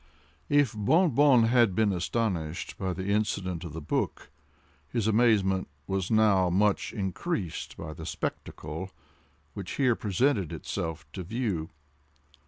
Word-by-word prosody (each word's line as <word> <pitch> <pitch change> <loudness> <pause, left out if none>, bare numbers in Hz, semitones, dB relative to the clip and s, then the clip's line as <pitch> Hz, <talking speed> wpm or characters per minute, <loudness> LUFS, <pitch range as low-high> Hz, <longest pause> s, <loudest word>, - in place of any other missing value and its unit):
If 145 -5 +3
Bon 160 - +3
Bon 130 -2 +5
had 115 -4 +4
been 110 -1 +3
astonished 90 -4 -2
at 95 -2 -2
the 95 +2 -4
incident 100 -4 -1
of 85 -4 -7
the 80 - -6
book, 75 - -2 0.6
his 115 -4 -1
amazement 105 -4 +3 0.2
was 95 -2 -2
now 105 -5 +4
much 100 +3 +2
increased 95 - -3
by 80 -1 -6
the 80 -1 -8
spectacle 80 +6 -5 0.6
which 95 -3 -6
here 130 -4 +2
presented 105 - +1
itself 80 -1 -4
to 95 - -5
view. 95 -5 -2
100 Hz, 130 wpm, -28 LUFS, 90-115 Hz, 0.6 s, Bon